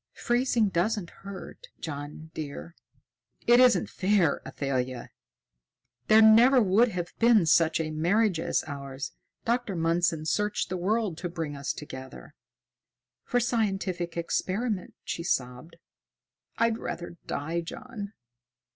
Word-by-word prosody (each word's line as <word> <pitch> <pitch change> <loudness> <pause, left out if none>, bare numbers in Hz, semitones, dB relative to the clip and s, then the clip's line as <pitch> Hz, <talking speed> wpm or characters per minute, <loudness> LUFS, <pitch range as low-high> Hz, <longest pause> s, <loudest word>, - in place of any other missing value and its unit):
"Freezing 240 -3 +1
doesn't 190 +1 -1
hurt, 200 - -10
John, 150 +1 -7
dear." 155 +3 -7 0.7
"It 240 +1 +6
isn't 250 -1 +5
fair, 185 -5 +1
Athalia! 130 -3 -3 1.0
There 220 +1 +7
never 235 +5 +7
would 215 +2 +4
have 180 -5 -4
been 230 -5 +5
such 165 0 +4
a 155 -1 -2
marriage 175 +4 +2
as - - 0
ours. 140 -2 -6 0.3
Dr. 235 -4 0
Mundson 165 -1 +1
searched 210 +5 0
the 185 - -2
world 195 -2 0
to 175 - -3
bring 160 -4 -4
us 140 0 -2
together." 130 - -9 0.9
"For 245 - +1
scientific 195 -7 -1
experiment!" 190 +4 -2
she - - -4
sobbed. 125 -1 -2 0.8
"I'd 230 0 +2
rather 170 0 -6
die, 165 +4 -2
John. 210 +2 -8
175 Hz, 120 wpm, -28 LUFS, 160-220 Hz, 1.0 s, There